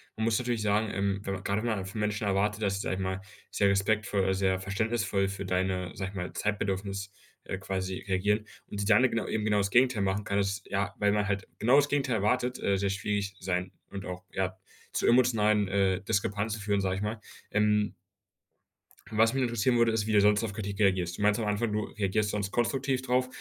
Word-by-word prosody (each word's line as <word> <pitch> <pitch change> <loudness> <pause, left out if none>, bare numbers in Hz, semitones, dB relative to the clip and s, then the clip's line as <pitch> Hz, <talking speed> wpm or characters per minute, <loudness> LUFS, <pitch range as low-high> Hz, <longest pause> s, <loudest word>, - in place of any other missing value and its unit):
man 110 - -1
muss 115 -1 +2
natürlich 120 -3 -1
sagen, 105 +1 +2
ähm, 100 0 -1
wenn 100 - -3
man 95 - -8
gerade 100 +2 0
wenn 120 - -1
man 100 -4 -1
von 95 +3 -6
Menschen 105 0 -1
erwartet, 105 +2 0
dass 100 -1 +1
sie 100 - -3
sage - - -1
ich 95 - -4
mal, 95 0 -2 0.3
sehr 100 - +3
respektvoll, 100 -1 +1
sehr 95 -1 +1
verständnisvoll 100 +1 0
für 95 0 -5
deine, 90 -1 -1
sage 95 -1 -3
ich 100 - -12
mal, 90 -1 -4
Zeitbedürfnis, 100 -1 -2 0.3
äh, 95 - -5
quasi 95 -1 -3
reagieren 105 +3 +1 0.2
und 100 - -6
sie 100 - -1
dann 110 +3 +6
genau 115 -3 +1
eben 110 -1 -1
genau 105 -1 +2
das 100 0 +1
Gegenteil 120 0 +3
machen 100 +1 0
kann, 100 0 -1
das, 100 0 -1
ja 100 0 -2
weil 105 0 +2
man 105 0 +1
halt 100 -1 -2
genau 120 +5 +4
das 145 0 +5
Gegenteil 135 -4 +1
erwartet, 125 +4 +1
äh, 100 -1 +2
sehr 100 +1 0
schwierig 100 0 -2
sein 90 0 -2 0.2
und 100 -1 -6
auch, 90 0 -6
ja, 95 -1 -1 0.4
zu - - +1
emotionalen, 110 -5 +4
äh, 95 -1 +2
Diskrepanzen 105 +2 -1
führen, 100 -1 0
sage 95 0 -1
ich - - -4
mal. 105 +2 -3 0.3
Ähm 105 0 +2 1.2
was 110 +2 +4
mich 135 -1 +1
interessieren 120 +1 +1
würde, 115 -1 +4
ist, 110 -2 0
wie - - 0
du 105 - +6
sonst 105 +2 +4
auf 105 - -3
Kritik 100 -1 -5
reagierst. 95 -4 +2
Du - - -6
meintest 105 +1 +3
am 105 - 0
Anfang, 105 +2 0
du 105 0 -1
reagierst 105 +1 -1
sonst 100 -2 -2
konstruktiv 130 +2 0
drauf. 130 0 +1
100 Hz, 220 wpm, -29 LUFS, 95-110 Hz, 1.2 s, dann